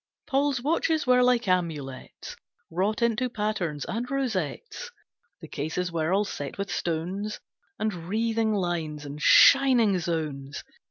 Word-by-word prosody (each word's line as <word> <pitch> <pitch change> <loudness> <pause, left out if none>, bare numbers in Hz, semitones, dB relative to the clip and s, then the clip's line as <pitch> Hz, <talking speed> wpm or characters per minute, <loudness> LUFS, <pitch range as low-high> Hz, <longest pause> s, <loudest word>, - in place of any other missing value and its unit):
Paul's 275 -3 0
watches 320 +1 +1
were 250 -1 +4
like 245 -2 +3
amulets, 155 -8 -3 0.4
Wrought 200 +7 0
into 235 +2 +1
patterns 200 -10 -2
and 240 +3 -4
rosettes; 270 - -3 0.5
The - - -9
cases 160 +5 -3
were 165 0 -1
all 200 +2 +2
set 145 -7 -6
with 200 -1 -4
stones, 180 +6 -3 0.4
And 215 -1 -1 0.2
wreathing 225 +1 0
lines, 165 -6 -2
and 145 +1 -8
shining 245 -8 +6
zones. 150 -5 -4
200 Hz, 125 wpm, -26 LUFS, 160-240 Hz, 0.5 s, shining